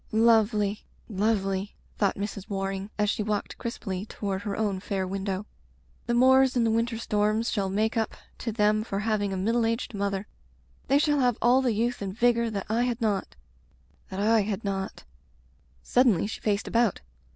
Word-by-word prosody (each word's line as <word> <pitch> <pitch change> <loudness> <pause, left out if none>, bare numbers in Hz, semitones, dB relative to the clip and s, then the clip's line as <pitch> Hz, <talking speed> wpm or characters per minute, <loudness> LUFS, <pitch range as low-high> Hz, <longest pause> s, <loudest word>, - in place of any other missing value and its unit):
"Lovely 215 -2 +3
— - - -18
^lovely/' 195 -1 0 0.3
thought 200 -2 +2
Mrs. 200 -1 -5
Waring 195 0 -3
as 210 -1 +2
she 215 - 0
walked 210 -1 -3
crisply 200 -4 -4
toward 195 -3 -3
her 205 -1 -4
own 205 -3 0
fair 190 0 -2
window. 195 +1 -3 0.6
"The 240 - +1
moors 260 +1 +5
and 240 -2 +3
the 225 - +2
winter 230 +1 0
storms 215 +1 0
shall 195 -3 0
make 215 +4 0
up 225 -1 -1 0.2
to 230 - -3
them 215 0 +2
for 200 -3 -3
having 210 -2 0
a 190 - -2
middle 230 +5 +1
aged 230 +1 -1
mother. 200 -1 -2 0.6
They 275 - +4
shall 295 0 +2
have 245 -3 +2
all 250 +3 +4
the 250 -3 +1
youth 240 +2 -1
and 195 0 -5
vigor 235 -1 +3
that 200 -3 -4
I 225 +2 +1
had 240 -1 -2
not 210 - -1 0.4
— 70 +4 -35
that 190 - -5
I 220 +2 +4
had 205 +1 -3
not. 195 - -3 0.8
Suddenly 245 -9 +3
she 215 - -6
faced 205 -1 0
about. 230 -4 +1
210 Hz, 185 wpm, -27 LUFS, 195-230 Hz, 0.8 s, moors